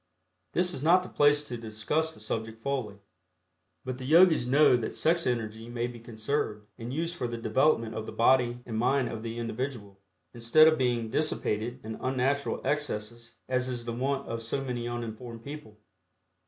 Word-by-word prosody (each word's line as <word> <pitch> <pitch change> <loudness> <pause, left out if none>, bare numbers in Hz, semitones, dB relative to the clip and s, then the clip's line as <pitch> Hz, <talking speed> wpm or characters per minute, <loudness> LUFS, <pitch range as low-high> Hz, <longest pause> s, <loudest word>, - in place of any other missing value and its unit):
This 180 0 +1
is 130 - -5
not 175 +4 +5
the 185 - -9
place 145 0 +4
to 125 -4 -6
discuss 115 +9 -1
the - - -15
subject 110 +1 -4
fully, 130 -7 -2 0.9
but 130 0 -4
the 130 - -6
Yogis 160 -3 +6
know 140 +1 +6
that 120 -2 -3
sex 165 +1 +2
energy 115 -1 -2
may 120 0 -2
be 120 -1 -7
conserved 110 -1 -3
and 115 +2 -5
used 165 +4 -2
for 125 - -2
the 120 0 -4
development 115 0 +2
of 110 0 -5
the - - -5
body 120 0 +3
and 110 -2 -3
mind 130 +2 +2
of 115 - -5
the 115 0 -5
individual, 115 -4 -4 0.3
instead 120 +7 +5
of 155 -2 +3
being 120 -3 0
dissipated 120 -5 -1
in 110 0 -6
unnatural 135 +2 0
excesses 115 -6 -3
as 130 0 0
is 120 -2 -4
the 120 - -3
wont 135 +3 -1
of 115 0 -4
so 115 +4 -2
many 120 -2 -3
uninformed 115 0 -6
people. 140 -7 -9
120 Hz, 180 wpm, -29 LUFS, 115-140 Hz, 0.9 s, Yogis